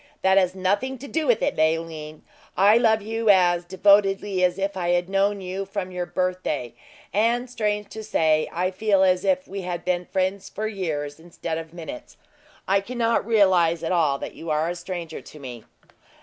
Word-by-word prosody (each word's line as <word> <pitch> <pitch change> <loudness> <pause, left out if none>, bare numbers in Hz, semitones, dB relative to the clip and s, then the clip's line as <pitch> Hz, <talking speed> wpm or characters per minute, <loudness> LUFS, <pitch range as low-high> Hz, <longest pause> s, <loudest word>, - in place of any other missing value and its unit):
"That 190 +1 +5
has 185 -1 0
nothing 200 +8 0
to 275 +3 -9
do 315 +1 -1
with 235 -3 +3
it, - - 0
Leoline. 155 -1 -1 0.3
I 200 +3 +6
love 220 -3 +3
you 225 +1 -1
as 175 -3 +4
devotedly 195 +1 +3
as 180 0 +2
if 195 0 -2
I 175 -2 -2
had 175 0 +1
known 195 +1 +1
you 190 +1 -4
from 195 -1 -5
your 180 -1 -4
birthday; 180 -9 -2 0.4
and, 235 +4 +1
strange 210 -4 -2
to 220 - -8
say, 155 -7 +1
I 180 +2 -1
feel 200 0 +2
as 185 0 +3
if 185 -1 +1
we 195 +1 -5
had 175 -1 -5
been 180 -1 0
friends 190 +1 -2
for 215 - -4
years 160 -8 -3
instead 165 -1 -5
of 160 -1 -9
minutes. 165 -7 -9 0.5
I 195 +1 +3
cannot 230 0 -1
realize 180 -7 +3
at 165 - -2
all 155 -6 +2
that - - -7
you 165 - -8
are 155 +2 +1
a - - -5
stranger 175 -2 -6
to - - -14
me!" 125 -5 -9
185 Hz, 190 wpm, -24 LUFS, 170-205 Hz, 0.5 s, I